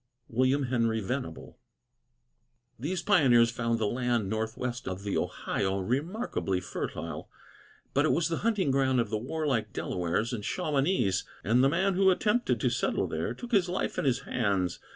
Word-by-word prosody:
WILLIAM 130 +4 +2
HENRY 115 -3 +1
VENABLE. 95 - -5 1.2
These 170 +7 -2
pioneers 125 - +5
found 115 0 0
the 110 - 0
land 120 -2 0
northwest 115 +3 -3
of 95 +1 -4
the 100 - -2
Ohio 95 0 -1
remarkably 130 - -1
fertile; 85 -3 -5 0.6
but 145 - +3
it - - +3
was 165 -1 +2
the 165 -1 -1
hunting 205 -9 +1
ground 130 -1 +2
of 115 -3 -1
the 110 - 0
warlike 130 -5 -1
Delawares 90 +7 -1
and 105 -3 -4
Shawanese, 140 - +1 0.2
and 115 +8 +3
the 135 - +5
man 190 +6 +1
who 190 +1 +4
attempted 210 +6 +2
to - - +3
settle - - 0
there - - -3
took 245 0 -9
his 190 -5 +3
life 180 - -2
in - - -1
his 125 -3 +2
hands. 100 -6 -1
125 Hz, 160 wpm, -29 LUFS, 110-160 Hz, 1.2 s, pioneers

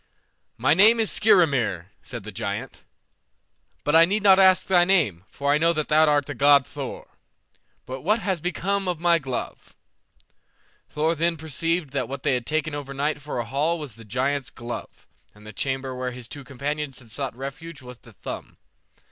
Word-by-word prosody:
"My 130 +6 +3
name 215 +7 +7
is 220 - +1
Skrymir," 140 - +2
said 120 -4 -7
the 110 - -7
giant, 100 +1 -5 1.0
"but 150 - +1
I 165 - +9
need 200 +5 +1
not 195 -1 +7
ask 190 -1 +5
thy 180 -2 +4
name, 155 - +2
for 140 +1 -1
I 150 - +2
know 165 +1 +3
that 155 -2 -3
thou 155 +1 +5
art 145 -2 +3
the 145 - -5
god 140 +1 +5
Thor. - - -7 0.8
But 130 +1 -6
what 210 - +2
has 190 -7 -2
become 195 +3 -1
of 175 -3 -2
my 170 0 +3
glove?" 130 -4 -6 1.1
Thor 155 +2 0
then 165 +1 0
perceived 160 0 -2
that 130 -3 -2
what 135 0 -6
they 145 - +2
had 125 -2 -2
taken 155 0 -1
overnight 145 +1 -3
for 145 -1 -5
a 120 - -2
hall 145 +8 0
was 150 -7 -7
the 115 +1 -14
giant's 130 +5 -1
glove, 120 -1 -8 0.3
and 105 0 -17
the 110 - -10
chamber 135 +2 -3
where 125 0 -3
his 125 -2 -9
two 145 +2 -8
companions 140 +2 -4
had 120 -4 -13
sought 135 +1 -4
refuge 135 +3 -8
was 125 -1 -11
the 115 - -16
thumb. - - -8
145 Hz, 185 wpm, -24 LUFS, 130-165 Hz, 1.1 s, I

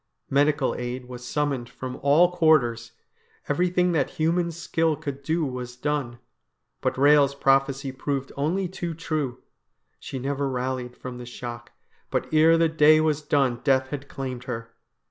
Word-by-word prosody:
Medical 145 0 +2
aid 125 +1 -5
was 125 -1 -9
summoned 135 -2 -2
from 130 0 -7
all 155 +6 +4
quarters. 125 -9 +2 0.5
Everything 180 +3 +2
that 155 -5 +1
human 170 +2 +1
skill 165 -1 0
could 140 -3 -6
do 160 +3 0
was 125 -2 -5
done. 135 -2 -2 0.6
But - - 0
Eehel's 140 0 +5
prophecy 135 0 +2
proved 135 0 -3
only 170 +7 0
too 175 -2 -5
true; 150 -6 -3 0.6
she 135 - -6
never 140 +1 -2
rallied 125 -1 -3
from 125 -1 -7
the 125 - -7
shock, 120 -1 -8 0.4
but - - -1
ere 160 +2 +6
the 165 0 +4
day 155 -1 +5
was 155 -1 +1
done 135 -5 +1
death 130 -2 +2
had 140 -1 -6
claimed 130 -2 -5
her. 115 -3 -6
140 Hz, 150 wpm, -25 LUFS, 125-155 Hz, 0.6 s, ere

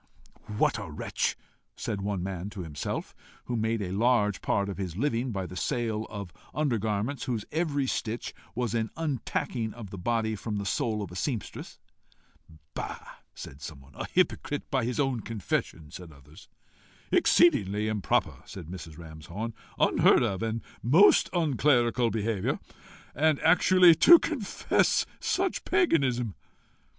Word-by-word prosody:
"What - - +2
a - - -7
wretch!" - - -2 0.4
said 105 -3 -4
one 100 -2 -2
man 95 0 -4
to 100 -3 -7
himself, 75 -3 -4 0.3
who 125 - -3
made 110 -1 0
a 90 - -4
large 105 -2 +2
part 100 0 0
of 100 -1 -5
his 90 -3 -4
living 125 -1 0
by 95 -3 -3
the 90 - -9
sale 110 -1 -1
of 100 -6 -7 0.2
under 145 -7 +1
garments 110 +6 -2
whose 115 -5 -2
every 150 -4 0
stitch 115 -2 -3 0.2
was 120 -3 -1
an 115 -1 0
untacking 125 -6 -2
of 110 -5 -9
the 95 - -7
body 110 +2 0
from 105 0 -4
the 100 - -3
soul 105 +2 -1
of 95 - -8
a - - -9
seamstress. 115 +1 -4 1.0
"Bah!" - - -4 0.4
said 70 - -10
some. 70 -3 -9
"A - - -5
hypocrite, 145 - 0
by 130 -4 +1
his 125 +3 -2
own 135 -4 +1
confession!" 100 -8 -3
said 90 0 -9
others. 70 +2 -16 0.6
"Exceedingly 105 - +4
improper!" 105 -3 0
said 95 -4 -9
Mrs. 85 -4 -8
Ramshorn. 85 +7 -7 0.2
"Unheard - - +4
of 95 0 -1
and 115 0 -2 0.2
most 165 - +5
unclerical 130 -7 +2
behaviour! 110 -3 -1 0.6
And 155 +1 +2
actually 180 +2 +6
to 345 - +9
confess 295 -12 +1
such 380 -1 -1
paganism!" 135 - +2
110 Hz, 145 wpm, -28 LUFS, 95-130 Hz, 1.0 s, to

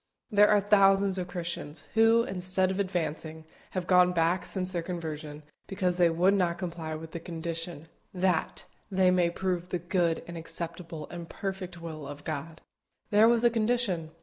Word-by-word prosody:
There 205 0 +6
are 210 - +5
thousands 195 -1 +4
of 180 - -3
Christians, 170 -4 -5
who, 225 +1 +5
instead 185 -1 +1
of 190 - -3
advancing, 160 -4 -3 0.3
have 180 - -1
gone 180 0 +5
back 170 +2 +1
since 185 -1 -2
their 175 -2 -1
conversion, 155 -4 -6 0.2
because 185 -2 -1
they 175 -2 +5
would 175 +4 +3
not 175 -3 +1
comply 170 -3 -5
with 160 +1 -8
the 170 - -5
condition, 165 -1 -5 0.2
"THAT" 180 -3 0 0.2
they 185 -1 +3
might 175 -2 +2
prove 180 -2 -2
the 180 - -1
good, 170 -1 0
and 170 -1 -7
acceptable, 165 -1 -6
and 170 -1 -7
perfect 190 -3 -5
will 155 -4 -7
of 145 +1 -9
God. 160 +1 -5 0.5
There 210 +2 +6
was 235 0 +3
a 240 - +5
condition. 220 -8 0
175 Hz, 170 wpm, -29 LUFS, 165-190 Hz, 0.5 s, There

